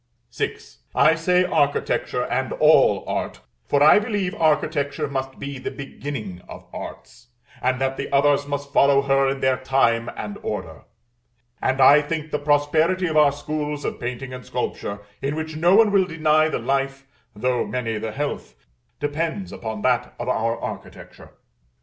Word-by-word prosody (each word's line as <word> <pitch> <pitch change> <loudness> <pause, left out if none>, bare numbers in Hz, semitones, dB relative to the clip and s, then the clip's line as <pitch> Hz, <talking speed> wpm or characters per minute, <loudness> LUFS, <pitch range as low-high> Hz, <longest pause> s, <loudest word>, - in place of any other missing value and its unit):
VI. - - -2 0.4
I - - +5
say 180 +2 +2
architecture 145 -5 0
and - - -2
all - - +4
art; - - -3 0.3
for 145 0 +3
I 155 - +7
believe 205 -4 -2
architecture 150 -4 0
must 135 -1 -4
be 140 -1 -6
the 130 - -4
beginning 135 -9 -7
of - - -10
arts, 120 +1 -9 0.3
and 130 0 +1
that 135 0 -1
the 140 - -5
others 145 0 +3
must 145 0 -4
follow 140 -1 +5
her 135 0 +3
in 135 0 -3
their 130 -1 +2
time 120 -3 +1
and 105 -1 -6
order; - - -5 0.8
and 130 +1 0
I 140 +3 +7
think 155 0 -4
the 150 - -1
prosperity 155 +5 +2
of 160 -3 -2
our 150 -2 +6
schools 150 0 -4
of - - -3
painting 125 +1 -5
and 125 0 -8
sculpture, 100 0 -4 0.2
in 140 +2 -2
which 160 0 -5
no 175 +4 +4
one 220 -1 +5
will 195 -2 +4
deny 155 -2 +2
the - - -1
life, 135 0 -2 0.3
though 125 +3 0
many 115 -4 -2
the 110 0 -4
health, 145 +6 -4 0.4
depends 160 +6 -3
upon 110 -2 -6
that - - +1
of - - -5
our 115 +2 0
architecture. - - -9
140 Hz, 160 wpm, -23 LUFS, 130-155 Hz, 0.8 s, I